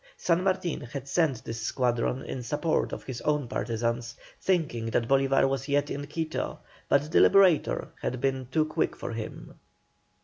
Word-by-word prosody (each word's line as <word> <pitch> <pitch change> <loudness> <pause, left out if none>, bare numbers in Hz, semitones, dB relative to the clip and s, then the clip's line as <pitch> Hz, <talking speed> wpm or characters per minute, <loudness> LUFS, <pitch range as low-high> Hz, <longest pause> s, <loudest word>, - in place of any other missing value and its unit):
San 175 +1 +1
Martin 185 -3 0
had 135 +3 -7
sent 140 -4 +1
this 115 0 -5
squadron 125 +2 0
in 130 - -5
support 150 +7 0
of - - -6
his 130 -2 -6
own 150 -3 0
partisans, 115 0 -2 0.3
thinking 155 -12 0
that 115 +1 0
Bolívar 135 0 +3
was 135 +1 -2
yet 145 0 +1
in 145 +1 -4
Quito, 160 +1 -3 0.3
but 145 +2 +2
the - - +5
Liberator 190 -6 +4
had 130 - -2
been 130 -1 -1
too 155 +4 +1
quick 155 +1 -1
for - - -5
him. 110 -1 -7
135 Hz, 165 wpm, -28 LUFS, 120-155 Hz, 0.3 s, the